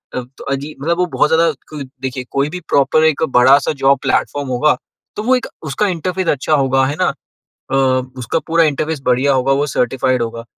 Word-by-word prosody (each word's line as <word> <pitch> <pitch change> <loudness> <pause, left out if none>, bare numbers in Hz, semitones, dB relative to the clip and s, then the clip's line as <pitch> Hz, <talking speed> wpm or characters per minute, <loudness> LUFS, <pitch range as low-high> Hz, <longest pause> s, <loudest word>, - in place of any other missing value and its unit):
अ, 125 - -1 0.3
अजीब, 140 +3 -4
मतलब 170 +4 0
वो 180 - +2
बहुत - - +3
ज़्यादा, 165 0 +3 0.5
देखिए, 130 -1 -4
कोई 140 +1 0
भी 180 +3 -6
प्रॉपर 140 +3 +3
एक 160 0 +2
बड़ा-सा 135 +3 +5
जॉब 135 +1 +5
प्लेटफ़ॉर्म 145 -1 0
होगा, 140 +4 +2 0.4
तो 235 +5 +2
एक 250 - -2 0.2
उसका 180 +10 0
इंटरफ़ेस 185 0 -2
अच्छा 145 +2 0
होगा, 135 -2 +2
है 145 +2 -2
ना? - - +3 0.7
अ, - - +2 0.4
उसका 125 +6 -1
पूरा 165 0 +4
इंटरफ़ेस 155 0 -1
बढ़िया 130 +3 +3
होगा, 130 +1 +2
वो 140 +2 +1
सर्टिफ़ाइड 130 -1 0
होगा। 115 0 -5
140 Hz, 180 wpm, -17 LUFS, 130-160 Hz, 0.7 s, बड़ा-सा